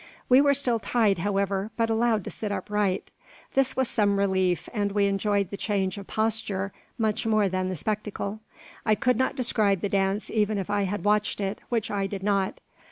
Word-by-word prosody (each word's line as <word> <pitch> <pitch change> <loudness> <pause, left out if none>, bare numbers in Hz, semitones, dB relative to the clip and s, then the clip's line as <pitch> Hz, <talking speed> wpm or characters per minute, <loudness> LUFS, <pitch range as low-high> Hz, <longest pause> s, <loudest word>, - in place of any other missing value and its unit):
We 255 +2 +7
were 285 -1 +4
still 250 -4 +1
tied, 215 -5 +2
however, 200 +1 0
but 225 -1 +1
allowed 225 -2 +2
to - - -6
sit 210 -2 -4
upright. 200 -1 -1 0.4
This 270 -1 +2
was 260 -1 +1
some 205 -3 +2
relief, 190 -4 +1
and 205 -3 -1
we 205 -1 +3
enjoyed 200 0 0
the 200 - -4
change 195 -3 -1
of 195 - -10
posture 215 -3 -1 0.2
much 220 0 0
more 215 -2 +3
than 185 0 -1
the 185 - -2
spectacle. 210 +2 -3 0.4
I 215 -1 +3
could 245 +3 +1
not 260 - +1
describe 215 -7 +1
the 205 - -1
dance 195 +1 0
even 215 -1 +1
if 195 0 -3
I 205 -1 +1
had 205 +2 -3
watched 210 0 +1
it, 195 +1 -3
which 230 -3 -1
I 200 -1 0
did 195 -1 -6
not. 195 -2 0
205 Hz, 195 wpm, -26 LUFS, 195-220 Hz, 0.4 s, We